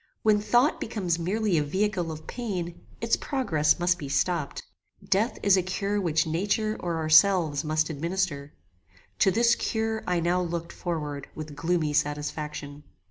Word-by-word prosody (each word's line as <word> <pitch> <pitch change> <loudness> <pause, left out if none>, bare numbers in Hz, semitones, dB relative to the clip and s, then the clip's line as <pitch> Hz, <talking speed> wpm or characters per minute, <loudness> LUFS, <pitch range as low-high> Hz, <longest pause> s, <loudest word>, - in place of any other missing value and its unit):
When 210 -1 +4
thought 245 +7 +2
becomes 185 -7 -1
merely 195 0 +1
a - - +1
vehicle 185 +1 -1
of 155 0 -8
pain, 185 -8 -4 0.2
its 230 0 +2
progress 160 - +1
must 175 0 +1
be 140 - -6
stopped. 165 0 -1 0.4
Death 205 +5 +1
is 200 -1 +6
a - - +3
cure 200 +3 -1
which 160 -3 +1
nature 200 +6 0
or 170 -2 -2
ourselves 160 -1 +4
must 155 0 +1
administer: 160 -2 -2 0.7
To - - +5
this 235 +4 +4
cure 220 0 -1
I 180 -1 +1
now 175 +2 +1
looked 170 -1 -4
forward 150 -5 -4
with 155 -1 -7
gloomy 165 -1 0
satisfaction. 150 0 -3
175 Hz, 150 wpm, -27 LUFS, 155-200 Hz, 0.7 s, is